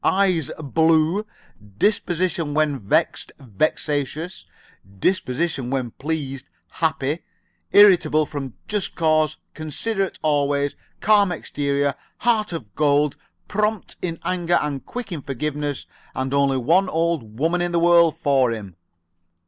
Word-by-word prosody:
Eyes, 185 -6 +2
blue; 160 +6 +2 0.5
disposition 175 - 0
when 150 -3 +1
vexed, 100 - 0
vexatious; 145 - -2 0.5
disposition 140 - 0
when 130 -3 -2
pleased, 140 -2 -4 0.2
happy; 155 -1 -1 0.5
irritable 180 -6 +6
from 135 -4 -6
just 205 -3 -2
cause; 155 -1 +2 0.2
considerate 195 +6 -3
always; 145 -1 +1 0.3
calm 205 -3 +4
exterior, 140 -3 -1 0.2
heart 220 -3 +1
of 120 - -7
gold; 145 -1 +2 0.3
prompt 210 0 -1
in 165 -2 -3
anger 175 -1 +1
and 145 -2 -4
quick 245 -4 -6
in 160 -4 -4
forgiveness; 145 +1 -3 0.3
and 130 +1 -2
only 140 -1 +3
one 175 +9 +3
old 160 -11 -1
woman 165 +5 +1
in 175 0 -1
the 170 - +1
world 170 -1 +5
for 135 -3 +3
him." 105 -6 -6
155 Hz, 115 wpm, -22 LUFS, 140-175 Hz, 0.5 s, irritable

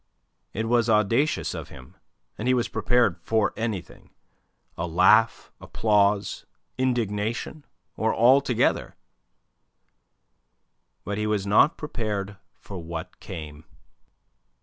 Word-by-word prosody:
It 110 +1 -3
was 120 0 +2
audacious 115 +8 +1
of - - -7
him, 65 -2 -14 0.4
and 110 - -4
he 130 - +4
was 120 -1 0
prepared 120 -8 +1
for 110 +3 +1
anything 110 -5 -5 0.7
a 85 - -3
laugh, 95 +7 +3
applause, 105 -2 +1 0.3
indignation, 120 +2 -2 0.3
or 110 0 0
all 130 +4 +5
together. 125 -4 0 2.1
But 100 +1 -4
he 105 - -1
was 105 -2 -1
not 105 +10 +4
prepared 105 -9 -4 0.2
for 95 -2 -9
what 85 +2 -7
came. 80 -4 -9
105 Hz, 105 wpm, -25 LUFS, 100-120 Hz, 2.1 s, all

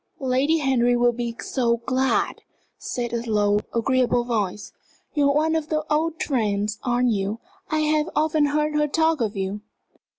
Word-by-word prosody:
"Lady 265 +5 +2
Henry 250 -4 +2
will 240 0 +4
be 235 -1 -4
so 235 -3 0
glad!" 260 +1 0 0.4
said 240 -2 -4
a 235 - -1
low, 205 -1 +2
agreeable 245 0 +1
voice. 210 -4 -3 0.4
"You 285 -2 +3
are 280 - +1
one 320 +2 +2
of 315 -1 -2
the 310 -1 -1
old 320 +1 0
friends, 210 -5 -1
aren't 245 0 +1
you? 200 +1 -1 0.3
I 310 0 +1
have 305 +1 +1
often 305 0 +2
heard 300 +1 0
her 300 0 +2
talk 320 -1 +1
of 215 -1 -1
you." 195 +2 -3
255 Hz, 165 wpm, -23 LUFS, 230-300 Hz, 0.4 s, will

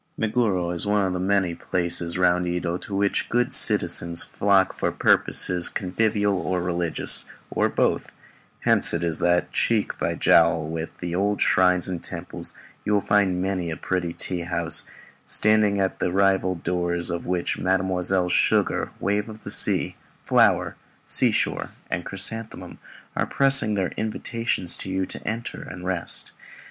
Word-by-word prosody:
Meguro 105 -6 -1
is 85 +3 -1
one 105 -1 +1
of 95 - -2
the 90 - -3
many 95 -1 0
places 85 0 0
round 90 -1 +1
Yedo 90 0 -3
to 100 - -7
which 100 0 -1
the - - -21
good 120 +1 +1
citizens 85 0 +4
flock 100 -2 +1
for - - -2
purposes 90 -1 +3
convivial 100 +1 -1
or 90 0 -2
religious, 85 -2 +1 0.3
or - - 0
both; - - -1 0.5
hence - - +3
it 85 - -3
is 85 -2 +1
that, 90 0 0
cheek 110 -3 -1
by - - -2
jowl 85 -1 +3
with 80 +1 -6
the 85 -1 -6
old 100 +3 -1
shrines 90 -1 +3
and 90 -3 -1
temples, - - -5 0.3
you 105 - -1
will 105 - +3
find 95 -3 +1
many 95 -3 -3
a 80 - -5
pretty 90 -2 -3
tea 90 +1 -3
house, 85 -1 -1 0.4
standing 105 -2 +2
at 95 -1 -2
the - - -1
rival 95 -1 +1
doors 85 0 -2
of 85 0 -5
which 90 -1 -2
Mesdemoiselles 95 -1 0
Sugar, - - +1
Wave 105 +2 -2
of 110 0 -12
the - - -4
Sea, - - +3 0.3
Flower, - - +2 0.3
Seashore, - - 0 0.2
and 90 - -2
Chrysanthemum 110 +5 -2 0.4
are - - -1
pressing 135 -5 +5
in - - -1
their 95 -2 -1
invitations 110 -3 -1
to - - -5
you 95 0 -2
to - - -2
enter 115 +2 -5
and 90 - -10
rest. 90 -2 -1
95 Hz, 160 wpm, -23 LUFS, 85-100 Hz, 0.5 s, pressing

